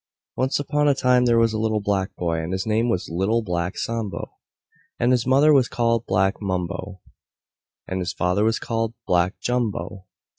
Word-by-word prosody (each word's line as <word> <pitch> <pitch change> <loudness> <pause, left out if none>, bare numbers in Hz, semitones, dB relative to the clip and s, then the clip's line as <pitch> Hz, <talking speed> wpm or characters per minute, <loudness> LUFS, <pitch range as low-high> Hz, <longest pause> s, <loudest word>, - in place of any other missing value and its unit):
Once 130 +1 0
upon 150 +1 0
a 140 - +4
time 125 -1 +3
there 120 -1 +3
was 115 -1 +3
a 110 - -2
little 110 -1 0
black 100 -2 -1
boy, 85 -2 -1
and 80 +3 -4
his 95 0 -2
name 110 +2 +1
was 90 -5 -1
Little 95 +7 0
Black 90 -1 -2
Sambo. 115 -4 -4 0.7
And 120 +1 +2
his 125 -1 +1
mother 140 +4 +5
was 130 -4 +4
called 115 -1 0
Black 95 +2 +1
Mumbo. 95 0 -4 0.9
And 95 - -3
his 90 - -2
father 90 +3 0
was 110 0 +2
called 115 0 -2
Black 90 +1 +1
Jumbo. 105 -6 -2
110 Hz, 180 wpm, -23 LUFS, 95-120 Hz, 0.9 s, mother